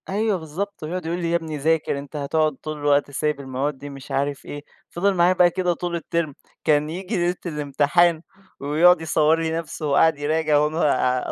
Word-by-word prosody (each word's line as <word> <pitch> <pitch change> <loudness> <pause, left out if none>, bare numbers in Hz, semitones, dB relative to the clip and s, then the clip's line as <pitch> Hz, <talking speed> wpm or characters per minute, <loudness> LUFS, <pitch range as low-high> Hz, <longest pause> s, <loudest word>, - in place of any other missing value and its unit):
أيوة 210 +1 0
بالضبط، 175 +4 -6
ويقعد 170 +2 -4
يقول 170 +2 -2
لي: 170 -1 -2
"يا - - +2
ابني 160 -2 -3
ذاكر، 155 -1 0
أنت 140 +1 -11
هتقعد 150 +1 0
طول 155 +3 -7
الوقت 145 -1 +1
سايب 150 +1 -1
المواد 135 +1 -3
دي." 145 +2 -9
مش 140 0 -11
عارف 140 0 -2
إيه، 145 0 -7 0.3
فِضل 195 +3 +1
معايا 180 0 +4
بقى 180 -1 +5
كده 180 0 0
طول 170 0 -3
الterm 165 -1 -2 0.3
كان 150 0 +2
ييجي 185 +6 -4
ليلة 175 0 +1
الامتحان 150 +2 +2 0.4
ويقعد 160 +5 +4
يصوّر 160 0 +2
لي 165 -1 -1
نفسه 165 -1 -5
وهو 140 -1 +1
قاعد 160 -2 +4
يراجع 155 0 +1
وأنا 150 -4 +1
155 Hz, 190 wpm, -23 LUFS, 145-175 Hz, 0.4 s, بقى